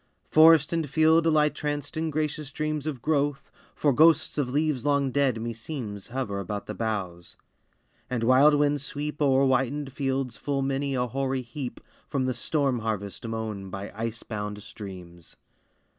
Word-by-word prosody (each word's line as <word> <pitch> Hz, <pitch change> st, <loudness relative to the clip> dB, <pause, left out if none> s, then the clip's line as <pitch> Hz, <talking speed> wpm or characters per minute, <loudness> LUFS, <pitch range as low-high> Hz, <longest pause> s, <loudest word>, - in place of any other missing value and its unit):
Forest 160 Hz, 0 st, +6 dB
and 165 Hz, -3 st, -1 dB
field 160 Hz, +2 st, +4 dB
lie 155 Hz, -1 st, +4 dB
tranced 145 Hz, -1 st, -4 dB
in 160 Hz, 0 st, -1 dB
gracious 150 Hz, -1 st, -2 dB
dreams 155 Hz, 0 st, -2 dB
Of 135 Hz, -6 st, -4 dB
growth, 145 Hz, -2 st, 0 dB, 0.2 s
for 145 Hz, -2 st, +2 dB
ghosts 160 Hz, +2 st, +4 dB
of 135 Hz, -3 st, 0 dB
leaves 145 Hz, -2 st, 0 dB
long 140 Hz, -2 st, +2 dB
dead, 135 Hz, -4 st, +1 dB
me 115 Hz, +1 st, -3 dB
seems, 115 Hz, -4 st, -6 dB
Hover 120 Hz, -5 st, -3 dB
about 100 Hz, +2 st, -4 dB
the -, -, -5 dB
boughs; 95 Hz, -6 st, -4 dB, 0.7 s
and 120 Hz, -2 st, -1 dB
wild 135 Hz, +5 st, +6 dB
winds 145 Hz, -1 st, +1 dB
sweep 150 Hz, +1 st, -5 dB
O'er 135 Hz, -1 st, +4 dB
whitened 135 Hz, +1 st, 0 dB
fields 135 Hz, -3 st, -2 dB
full 140 Hz, -1 st, -1 dB
many 135 Hz, 0 st, -1 dB
a 125 Hz, -1 st, +1 dB
hoary 130 Hz, +1 st, -2 dB
heap 125 Hz, +2 st, -6 dB, 0.3 s
From 135 Hz, -2 st, -1 dB
the 130 Hz, -, 0 dB
storm 135 Hz, +1 st, 0 dB
harvest 110 Hz, 0 st, -4 dB
mown 110 Hz, -4 st, -4 dB
by 100 Hz, +2 st, -6 dB
ice 115 Hz, +1 st, -4 dB
bound 105 Hz, -2 st, -5 dB
streams! 90 Hz, -5 st, -10 dB
135 Hz, 160 wpm, -27 LUFS, 115-145 Hz, 0.7 s, Forest